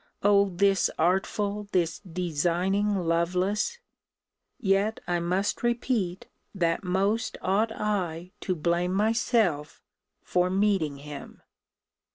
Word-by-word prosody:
O 200 0 +5
this 195 +1 +2
artful, 200 +4 0
this 170 -3 +1
designing 180 +3 0
Lovelace 180 - 0 0.8
yet 205 -1 +1
I 175 -1 0
must 180 +4 -1
repeat, 235 -6 -1 0.3
that 170 -2 0
most 195 +5 0
ought 210 +4 +1
I 180 -5 -2
to 185 - -2
blame 175 +3 0
myself 215 - +1 0.4
for 180 0 +1
meeting 190 -7 +1
him. 145 0 -10
190 Hz, 100 wpm, -27 LUFS, 175-205 Hz, 0.8 s, O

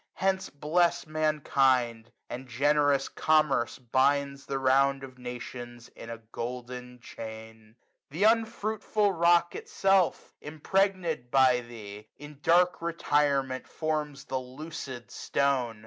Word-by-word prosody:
55 - - -15
Hence 190 0 0
bless 170 +4 +1
mankind; 135 -7 +1 0.2
and 130 +2 -7
generous 145 +2 +2
Commerce 150 -6 +1
binds 140 +3 0
The 135 - -2
round 135 +1 +3
of 130 -1 -11
nations 120 -1 -8
in 115 - -11
a 115 - -5
golden 125 +1 -6
chain. 110 -1 -10 0.3
Th* 160 +8 -2
unfruitful 220 -2 +1
rock 170 0 +3
itself, 195 -2 +1
impregnM 165 -2 -1
by 130 -1 +4
thee, 105 -3 -10
140 145 - -10
In 145 -1 -13
dark 175 +2 +3
retirement 145 -5 0
forms 150 -3 -3
the 130 - -2
lucid 130 -2 -8
stone. 130 -5 0
140 Hz, 115 wpm, -28 LUFS, 125-155 Hz, 0.3 s, by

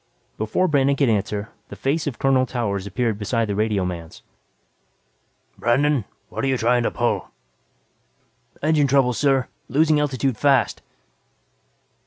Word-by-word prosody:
Before 110 +12 +1
Brandon 140 -3 +2
could 140 -2 +2
answer, 105 0 -1 0.2
the - - -8
face 150 +4 -1
of 135 - -3
Colonel 130 -1 +2
Towers 100 -6 -2
appeared 110 +1 -1
beside 115 +2 0
the 100 - -2
radioman's. 95 -6 -2 1.4
"Brandon, 130 0 +2 0.2
what're - - -5
you 135 -1 +1
trying 120 +1 +2
to 115 - +1
pull?" - - -1 1.3
"Engine 155 -2 +3
trouble, 135 -2 +3
sir. 135 0 +1 0.2
Losing 155 +3 +3
altitude 135 -4 -1
fast." 135 -4 +2
125 Hz, 125 wpm, -22 LUFS, 110-140 Hz, 1.4 s, Engine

